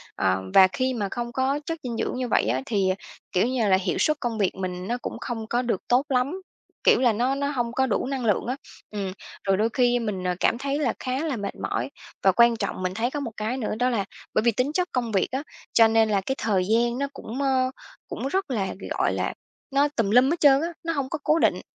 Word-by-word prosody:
ờ, 95 0 +1
và 190 -1 +8
khi 255 +6 -1
mà 210 -4 -1
không 240 0 -3
có 265 +3 0
chất 330 0 -3
dinh 240 -3 -4
dưỡng - - -2
như 255 - -2
vậy - - +2
á 130 - 0
thì, 195 -4 +1 0.4
kiểu 185 +5 +2
như 245 -4 +1
là, 190 - +5
hiệu 190 -1 -1
suất 305 -1 +2
công 235 -3 -2
việc 195 -2 +1
mình 185 -1 -4
nó 240 - -1
cũng 230 - -5
không 225 -3 -4
có 240 +2 +1
được 235 -6 -1
tốt 255 +4 +3
lắm, 275 +8 0 0.4
kiểu, - - +5
là 245 -3 +4
nó 250 +5 +1
nó 280 0 -1
hông 240 -4 -1
có 265 +2 +1
đủ 250 0 0
năng 265 -3 -2
lượng 210 -3 +2
á. 255 - -1 0.4
Ừm, 200 -3 -3 0.3
rồi 195 -1 +2
đôi 220 +3 +2
khi 245 -1 +3
mình, 195 -5 -3
à, 180 - 0
cảm 230 - +2
thấy 275 +3 -2
là 300 - +1
khá 255 0 -2
là 300 -5 -1
mệt 200 -1 -4
mỏi 120 +4 -2 0.3
và 190 - +6
quan 235 +4 +5
trọng 200 -3 -3
mình 185 0 -1
thấy 235 +5 -1
có 295 - -3
một 245 -5 -4
cái 220 +4 -2
nữa 225 -4 -2
đó 250 +1 +3
là 210 -6 0 0.3
bởi - - +3
vì 235 +1 +3
tính 250 +6 0
chất 360 +2 0
công 240 -3 -1
việc 195 - +2
á, 270 +3 -2 0.3
cho 225 -1 +7
nên 225 0 +3
là 200 -2 +2
cái 265 +8 -2
thời 200 -5 +1
gian 235 +1 +2
nó 280 - 0
cũng, 260 0 -6
ơ, 260 -2 +2 0.4
cũng - - -4
rất 380 +1 -1
là, 200 -6 -1 0.3
gọi - - +2
là, - - -1 0.4
nó 280 +2 +4
tùm 220 -4 +1
lum 250 +3 +6
hết 335 +2 0
trơn 280 -1 +6
á, 335 - 0 0.2
nó 330 0 -1
hông 275 -3 -2
có 305 - -3
cố 310 +2 +3
định. - - +2
240 Hz, 260 wpm, -25 LUFS, 210-265 Hz, 0.4 s, và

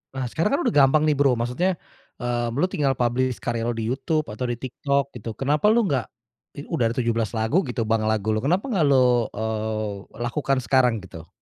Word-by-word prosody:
Nah 130 - -2
sekarang 165 +6 0
kan - - -1
udah 240 - +1
gampang 145 +2 +5
nih 150 -1 +3
Bro, 135 -3 +4
maksudnya, 125 +11 0 0.5
eee, 120 -1 -1
lu 160 - +2
tinggal 140 -3 +1
publish 125 +1 0
karya 115 -1 -1
lu 120 - -1
di 115 - -3
YouTube 155 +3 0
atau 120 +4 -4
di 120 - -1
TikTok 140 +3 -2
gitu 115 -1 -6
kenapa 150 +8 +1
lu 230 +2 +4
nggak, 140 - 0 0.5
i - - -4
udah 125 -8 +1
ada - - -6
17 115 -1 -1
lagu 110 +11 +2
gitu 120 -1 -2
Bang, 110 0 0
lagu 110 0 0
lu 110 - +1
kenapa 170 - +1
nggak 175 -9 +2
lu, 125 -4 +4
eee, 110 -1 -2 0.3
lakukan 135 +2 0
sekarang 125 -6 +2
gitu. 80 -3 -11
125 Hz, 205 wpm, -24 LUFS, 115-145 Hz, 0.5 s, gampang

